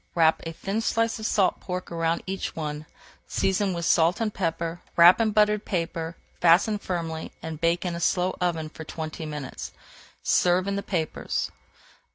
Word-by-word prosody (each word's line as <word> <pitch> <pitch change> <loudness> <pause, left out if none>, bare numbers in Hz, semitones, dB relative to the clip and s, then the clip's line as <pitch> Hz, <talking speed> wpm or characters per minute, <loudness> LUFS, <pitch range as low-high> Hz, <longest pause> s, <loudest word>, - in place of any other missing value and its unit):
Wrap 160 -2 +4
a - - -3
thin 195 +6 -3
slice 230 0 0
of 220 - -2
salt 195 -3 +2
pork 180 -1 -5
around 165 0 0
each 190 0 -4
one, 150 -1 -4 0.4
season 195 +1 +1
with 170 -1 -3
salt 165 +1 +3
and 220 -2 -1
pepper, 165 -1 -2 0.2
wrap 175 +5 +8
in 225 - +3
buttered 210 0 +3
paper, 165 -2 -3 0.2
fasten 185 +5 +4
firmly, 165 -4 -4
and 160 -1 -6
bake 170 +2 +1
in 175 - -1
a 170 - -4
slow 180 +2 +1
oven 165 -3 0
for 160 - -9
twenty 160 0 -6
minutes. 150 -3 -6 0.5
Serve 180 +2 +3
in 200 - 0
the 200 - -1
papers. 165 -6 -2
175 Hz, 170 wpm, -26 LUFS, 165-195 Hz, 0.5 s, wrap